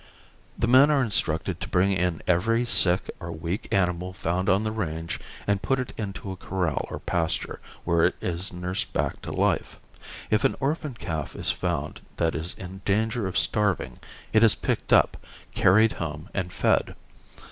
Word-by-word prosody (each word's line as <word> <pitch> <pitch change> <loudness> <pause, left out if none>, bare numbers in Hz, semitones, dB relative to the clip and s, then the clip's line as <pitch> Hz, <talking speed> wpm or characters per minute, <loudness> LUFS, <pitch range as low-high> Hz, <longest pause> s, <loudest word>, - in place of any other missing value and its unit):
The - - +1
men 130 +4 +7
are 145 -3 +3
instructed 90 -4 0
to 95 - -4
bring 95 0 +3
in 90 -3 0
every 115 +7 +2
sick 90 -6 +2
or 85 -2 -6
weak 85 +7 -4
animal 90 -2 +1
found 90 +1 -1
on 95 +3 +3
the 110 - -1
range 85 -6 -3 0.3
and 100 -1 +1
put 135 -1 +1
it 130 - -4
into 100 -2 -5
a - - -5
corral 90 -4 -2
or - - -4
pasture, 85 -2 -2 0.2
where 85 -1 +3
it 90 - +2
is 90 +2 -2
nursed 90 +1 -3
back - - -1
to - - -6
life. - - 0 0.5
If 110 +3 +3
an 135 - +3
orphan 145 -1 -1
calf 80 -9 -4
is - - 0
found - - -3
that 80 -1 +1
is 80 +3 -4
in 95 +1 -9
danger 110 +1 +1
of 90 - -2
starving 95 +5 0 0.3
it 110 - +6
is 115 - +6
picked - - -2
up, - - +5 0.4
carried 110 +4 +5
home 80 +2 -5
and 90 -2 -2
fed. - - +1
95 Hz, 175 wpm, -26 LUFS, 85-110 Hz, 0.5 s, men